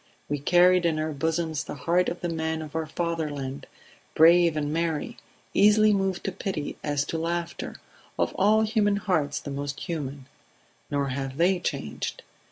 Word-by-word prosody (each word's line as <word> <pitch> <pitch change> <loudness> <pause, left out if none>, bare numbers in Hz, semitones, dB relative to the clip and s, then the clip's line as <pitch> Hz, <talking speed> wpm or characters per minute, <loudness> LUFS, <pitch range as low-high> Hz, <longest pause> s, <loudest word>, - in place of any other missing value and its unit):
We 145 0 -2
carried 180 +4 +5
in 165 -2 +1
our 155 0 -1
bosoms 160 +1 -1
the - - -7
hearts 170 +7 +1
of 175 - -6
the 175 - -2
men 160 -1 -2
of 155 0 -10
our 160 -1 -1
fatherland, 150 -5 -3 0.5
brave 170 0 +6
and 150 0 -1
merry, 165 +6 -2 0.4
easily 210 +1 +5
moved 195 -2 0
to 195 - -2
pity 185 -5 -4
as 145 -1 0
to 165 - -3
laughter, 170 +1 -3 0.4
of - - 0
all 215 +3 +4
human 210 -2 +2
hearts 160 -8 0
the 140 - -7
most 140 0 -4
human; 145 -6 -5 0.6
nor 140 -1 0
have 135 0 -4
they 180 +2 +3
changed. 75 - -4
160 Hz, 165 wpm, -26 LUFS, 145-180 Hz, 0.6 s, brave